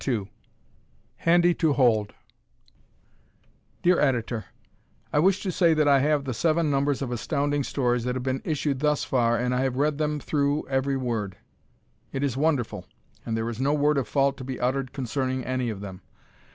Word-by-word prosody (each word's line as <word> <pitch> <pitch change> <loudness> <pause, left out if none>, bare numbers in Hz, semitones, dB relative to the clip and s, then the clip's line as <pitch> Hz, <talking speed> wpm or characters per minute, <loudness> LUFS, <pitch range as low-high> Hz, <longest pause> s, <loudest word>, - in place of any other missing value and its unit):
"Handy 175 +1 +4
to 160 -3 +1
Hold" 115 -6 +2 1.7
Dear 180 0 +4
Editor: 120 -6 0 0.7
I 150 - +3
wish 190 +4 +3
to 190 - -1
say 170 -2 +3
that 155 -1 +2
I 140 -1 +5
have 145 +1 +2
the 130 - -2
seven 160 +3 +1
numbers 140 0 +1
of 125 - -4
Astounding 145 +4 -1
Stories 125 -3 0
that 125 0 -1
have 130 - -3
been 130 0 -1
issued 145 -4 -1
thus 150 0 +1
far 120 -2 +1
and 125 +1 0
I 125 - +1
have 130 -1 0
read 150 +1 +1
them 150 -1 0
through 145 +1 0
ever 135 0 0
word. 110 -7 -3 0.7
It 135 - -3
is 135 -4 0
wonderful, 140 -4 -1 0.4
and 115 -1 -1
there 115 0 -2
is 120 +1 -4
no 145 +2 +2
word 150 0 +2
of 130 - -3
fault 140 -1 +1
to 130 - -8
be 130 0 -5
uttered 130 +1 -1
concerning 130 0 -2
any 130 -1 -1
of 105 -3 -5
them. 95 -2 -8
135 Hz, 180 wpm, -26 LUFS, 125-150 Hz, 1.7 s, I